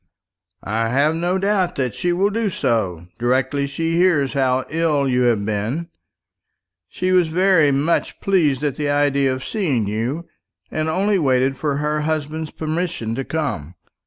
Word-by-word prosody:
"I 110 +3 -1
have 145 +6 +2
no 175 +3 0
doubt 195 -2 +1
that 130 -4 -1
she 175 - -1
will 195 +4 +1
do 225 0 0
so, 110 - -1
directly 130 +3 +1
she 165 +4 -1
hears 165 -7 +3
how 130 -2 +1
ill 155 -3 +1
you 125 -1 +1
have 105 -4 0
been. 110 +11 -2 1.0
She 185 0 -2
was 180 -2 +4
very 180 -2 +3
much 145 +5 0
pleased 155 -9 +1
at 145 -3 -1
the 150 -1 -1
idea 140 -2 +2
of 130 0 -4
seeing 150 - 0
you, 120 +11 -3 0.4
and 155 0 -1
only 195 +4 +1
waited 135 -2 +2
for 145 +1 -1
her 150 +1 -1
husband's 155 0 -2
permission 160 -8 -3
to 135 +3 -2
come. 130 - -3
145 Hz, 160 wpm, -21 LUFS, 130-170 Hz, 1.0 s, was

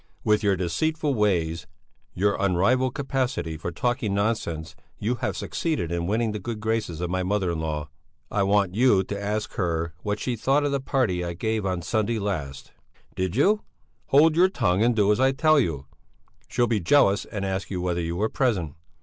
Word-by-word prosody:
With 105 0 +3
your 100 -2 +2
deceitful 145 - -1
ways, 85 -7 0 0.5
your 100 +2 +2
unrivalled 120 +8 +2
capacity 135 - -2
for 80 +2 -5
talking 110 +1 -1
nonsense, 85 -7 -2 0.2
you 110 +4 -1
have - - -2
succeeded 155 - -2
in 85 0 -1
winning 110 +2 0
the 105 - -4
good 115 +2 -5
graces 110 -7 -2
of 90 0 -2
my 95 0 0
mother 95 -1 0
in 85 - -3
law. 75 -2 -3 0.4
I 105 - +1
want 100 -1 +2
you 110 -3 +4
to 100 +1 -5
ask 105 +1 -2
her 85 -3 -1
what 105 +3 -2
she 125 - -2
thought 135 +6 +2
of 145 - 0
the 140 - 0
party 130 -10 0
I 85 0 -3
gave 110 +2 -1
on 90 -2 -2
Sunday 110 +5 0
last." 80 -10 -4 0.4
"Did 95 0 -2
you...." 205 - +3 0.5
"Hold 155 +3 +5
your 180 +3 +5
tongue 90 - +1
and 120 0 +3
do 105 -1 +3
as 105 - +1
I 135 +1 +4
tell 155 +2 +4
you! 75 - -1 0.6
She'll 120 - +1
be 115 -3 0
jealous 100 -1 +3
and 100 -2 -4
ask 95 0 -3
you 95 - -3
whether 90 -1 -1
you 85 +1 -3
were 105 +5 +1
present. 105 - 0
100 Hz, 190 wpm, -25 LUFS, 90-120 Hz, 0.6 s, Hold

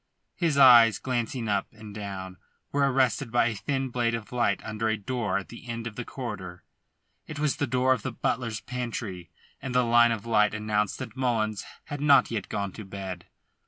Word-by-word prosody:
His 165 -5 0
eyes, 120 -6 +8
glancing 125 -1 -2
up 100 -2 0
and 110 -1 -11
down, 95 -3 -6 0.3
were 140 -1 +2
arrested 130 -1 +1
by 120 - +3
a - - -3
thin 135 +6 -2
blade 120 -1 0
of 115 -2 -7
light 120 -5 +1
under 110 +1 -2
a 110 - 0
door 105 -2 -2
at 100 - -6
the 120 +1 -11
end 115 0 -4
of 115 -2 -6
the 120 - -4
corridor. 105 -9 -7 0.6
It 155 - -7
was 145 -1 0
the 145 -2 0
door 130 +1 +3
of 125 - -3
the - - -4
butler's 115 -3 -2
pantry, 115 -8 -5 0.3
and 130 -2 -5
the 125 -1 +4
line 120 0 +5
of 110 -2 -3
light 105 -2 +3
announced 105 -1 -1
that 130 - -7
Mullins 115 -5 0 0.2
had 145 -1 -6
not 145 -4 +5
yet 110 -4 -3
gone 100 -1 -2
to 110 - -9
bed. 95 -2 -7
115 Hz, 195 wpm, -27 LUFS, 105-125 Hz, 0.6 s, eyes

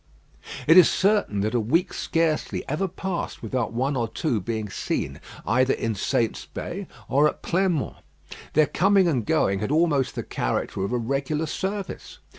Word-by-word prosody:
It 160 +4 +7
is 180 - +9
certain 195 - +2
that 110 +3 -1
a 120 - +2
week 155 +11 +1
scarcely 165 -2 -1
ever 155 +7 -1
passed 185 0 -4
without 130 -3 -1
one 130 +5 -1
or 120 -3 0
two 110 +2 -1
being 110 +2 -3
seen 95 - -3 0.2
either 130 +5 +3
in 115 -1 -2
Saint's 110 +3 -1
Bay - - -6 0.2
or 145 +3 +4
at - - -4
Pleinmont. 175 -4 0 0.6
Their 155 0 +5
coming 195 +3 +3
and 130 -9 +1
going 100 -1 +1
had 105 +6 -2
almost 150 -4 +2
the - - -3
character - - -2
of 100 - -2
a 125 - +1
regular 140 +6 -1
service. 195 +5 -4
140 Hz, 165 wpm, -25 LUFS, 115-170 Hz, 0.6 s, is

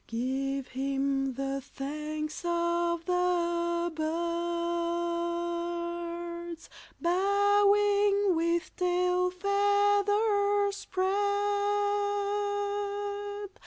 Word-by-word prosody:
Give 265 +3 -2
him 270 0 -1
the 275 +1 -2
Thanks 305 +3 -5
of 340 0 0
the 345 -1 0
Birds, 340 +1 -2 0.3
Bowing 405 +1 +3
with 335 +2 0
tail 360 0 +2
feathers 405 +1 +2
spread! 380 0 -1
345 Hz, 55 wpm, -29 LUFS, 335-385 Hz, 0.3 s, Bowing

